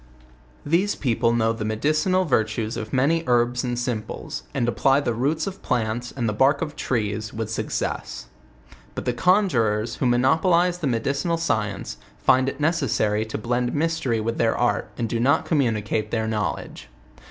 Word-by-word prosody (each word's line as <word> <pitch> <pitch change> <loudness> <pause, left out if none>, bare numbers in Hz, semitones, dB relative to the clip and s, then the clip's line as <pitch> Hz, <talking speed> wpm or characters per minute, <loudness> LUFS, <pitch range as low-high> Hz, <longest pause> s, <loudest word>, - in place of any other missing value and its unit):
These 180 +7 +2
people 115 -3 +1
know 115 -1 +2
the 115 - -5
medicinal 155 - +1
virtues 110 -4 0
of 110 -2 -5
many 145 +6 +2
herbs 120 0 +2
and 120 -1 -2
simples, 110 - -4
and 120 -3 -1
apply 135 +3 +3
the 120 - -1
roots 145 +7 0
of 195 0 -6
plants 120 0 -1
and 120 -4 -2
the 105 - 0
bark 135 +7 +3
of 150 -2 -6
trees 110 -5 -2
with 110 -1 -4
success. 110 - -3 0.7
But - - -5
the 125 - +1
conjurers, 120 - +2
who 130 - +1
monopolize 170 +8 +3
the 155 - -1
medical 140 +7 0
science, 105 - -2 0.2
find 130 - +3
it - - -8
necessary 135 -9 +1
to 110 - -5
blend 120 +2 -1
mystery 145 -7 0
with 115 +1 -2
their 115 -1 +2
art, 120 -2 0
and 115 - -1
do 115 +1 -2
not 140 +6 +2
communicate 110 -7 0
their 110 -1 -1
knowledge. 105 -9 -3
120 Hz, 165 wpm, -23 LUFS, 110-145 Hz, 0.7 s, apply